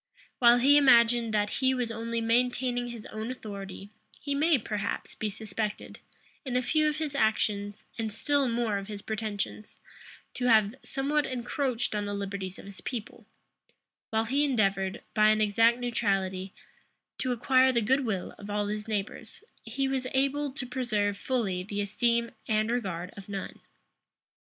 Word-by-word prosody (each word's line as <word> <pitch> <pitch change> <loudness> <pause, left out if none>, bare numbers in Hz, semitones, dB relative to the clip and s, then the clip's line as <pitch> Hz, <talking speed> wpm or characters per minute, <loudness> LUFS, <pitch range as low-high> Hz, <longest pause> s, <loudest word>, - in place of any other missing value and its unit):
While 240 -1 +7
he 280 +4 +6
imagined 235 -4 +5
that 210 0 +1
he 260 0 +3
was 245 -2 -1
only 230 +1 -3
maintaining 245 +1 +1
his 235 -3 -8
own 220 +2 -4
authority, 200 -4 -7 0.3
he 285 - -3
may, 305 +2 +4
perhaps, 210 -3 -3
be 215 - -3
suspected, 210 0 -5 0.4
in 255 -3 -4
a 250 - +2
few 310 +4 +2
of 300 - -3
his 310 -3 -3
actions, 210 -4 0 0.2
and 220 -1 -1
still 285 +5 +1
more 230 -3 0
of 195 - -8
his 205 -2 -6
pretensions, 215 -1 -4 0.5
to 250 - -3
have 215 -3 +5
somewhat 290 +2 0
encroached 250 -1 -2
on 205 -1 -1
the 205 0 -3
liberties 195 -1 -4
of - - -11
his 200 -1 -9
people: 235 -5 -6 0.8
while 220 0 +1
he 275 +5 +1
endeavored, 195 -8 +1
by 215 0 +5
an 215 0 +3
exact 225 +3 +4
neutrality, 195 -6 -1 0.7
to 255 - -1
acquire 260 +2 +4
the 240 - +2
good 265 +5 +2
will 200 -7 -2
of 205 0 -9
all 205 0 0
his 210 +1 -4
neighbors, 215 - -4 0.2
he 275 0 -1
was 265 -1 -1
able 275 +1 +1
to 275 -3 -5
preserve 225 -5 0
fully 200 -5 -1
the 200 +2 -5
esteem 235 +3 +1 0.2
and 215 +1 +1
regard 190 -7 -2
of 200 0 -11
none. 195 -1 -5
225 Hz, 160 wpm, -29 LUFS, 205-255 Hz, 0.8 s, While